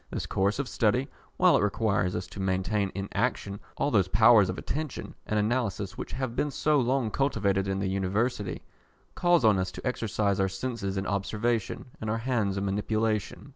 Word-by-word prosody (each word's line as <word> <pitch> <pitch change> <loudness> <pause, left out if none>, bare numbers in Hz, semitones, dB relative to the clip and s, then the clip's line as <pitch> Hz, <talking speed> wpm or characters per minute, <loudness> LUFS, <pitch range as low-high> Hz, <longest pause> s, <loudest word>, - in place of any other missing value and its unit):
This - - -3
course 100 +2 0
of 140 -1 -2
study, 120 +4 +1 0.3
while - - +5
it - - +3
requires 100 -3 +1
us 90 - -3
to 90 +3 -10
maintain 95 +2 0
in 100 0 -3
action 100 0 -1 0.2
all 145 - 0
those 100 -5 +3
powers 110 -1 +6
of 90 - -3
attention 155 -1 -4
and 110 - 0
analysis 105 -3 -1
which - - -6
have 130 -2 -3
been 150 - 0
so 150 +1 +2
long 125 -2 +1
cultivated 100 -8 +1
in 95 0 -1
the 95 0 -1
University, 100 +2 -1 0.5
calls 175 -7 +3
on 105 -3 +5
us 95 0 -1
to - - -9
exercise 105 -5 0
our 95 0 +2
senses 100 -1 -3
in 95 - -2
observation, 105 +3 -1 0.2
and 110 - -3
our 110 - 0
hands 115 -5 0
in 95 - -1
manipulation. 110 +4 -1
105 Hz, 185 wpm, -28 LUFS, 95-120 Hz, 0.5 s, powers